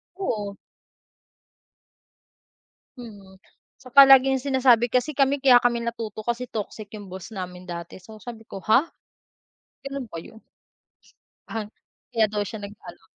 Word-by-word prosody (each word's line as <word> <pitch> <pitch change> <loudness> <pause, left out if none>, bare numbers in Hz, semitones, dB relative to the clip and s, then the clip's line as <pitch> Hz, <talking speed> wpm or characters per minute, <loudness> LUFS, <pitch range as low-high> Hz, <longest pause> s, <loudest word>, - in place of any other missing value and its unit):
Oo. 210 - -3 2.4
Mm. 205 -6 -12 0.4
Tsaka 265 +2 +6
laging 265 0 +6
sinasabi 255 -4 +4
kasi 255 +4 0
kami 275 +1 +2
kaya 260 -3 +6
kami 240 -1 +2
natuto 225 -2 -5
kasi 240 +1 -2
toxic 215 0 -6
yung 205 -2 -9
boss 185 +2 -9
namin 180 -3 -7
dati 170 +1 -7
so 215 +3 -13
sabi 230 0 -9
ko, - - -7
ha. 255 +9 +4 1.0
Ganun 275 -2 -5
ba - - -8
yun? 220 +7 -12 1.1
Ah, 225 -1 -4 0.5
kaya 225 -2 +3
daw 210 0 -2
siya 215 +2 -7
nag-ano. 205 -1 -11
225 Hz, 130 wpm, -24 LUFS, 205-255 Hz, 2.4 s, Tsaka